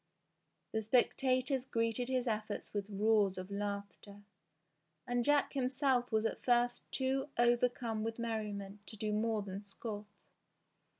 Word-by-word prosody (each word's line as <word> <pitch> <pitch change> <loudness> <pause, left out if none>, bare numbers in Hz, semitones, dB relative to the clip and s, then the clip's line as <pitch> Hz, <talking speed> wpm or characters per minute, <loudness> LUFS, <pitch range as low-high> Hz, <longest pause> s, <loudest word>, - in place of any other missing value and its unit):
The 220 - 0
spectators 255 +3 +2
greeted 230 +1 0
his 255 -1 +1
efforts 215 -2 -3
with 205 0 -2
roars 205 -1 +3
of 185 +2 -6
laughter, 200 0 -5 0.8
and 245 0 +1
Jack 290 +2 +3
himself 255 -2 +1
was 220 0 +2
at - - -1
first 245 0 +3
too 270 +1 0
overcome 240 -2 +2
with 225 0 -3
merriment 210 -3 -3
to 215 - -9
do 215 0 -1
more 215 0 +1
than 195 +1 -6
scoff. 205 +1 -6
225 Hz, 130 wpm, -35 LUFS, 205-245 Hz, 0.8 s, roars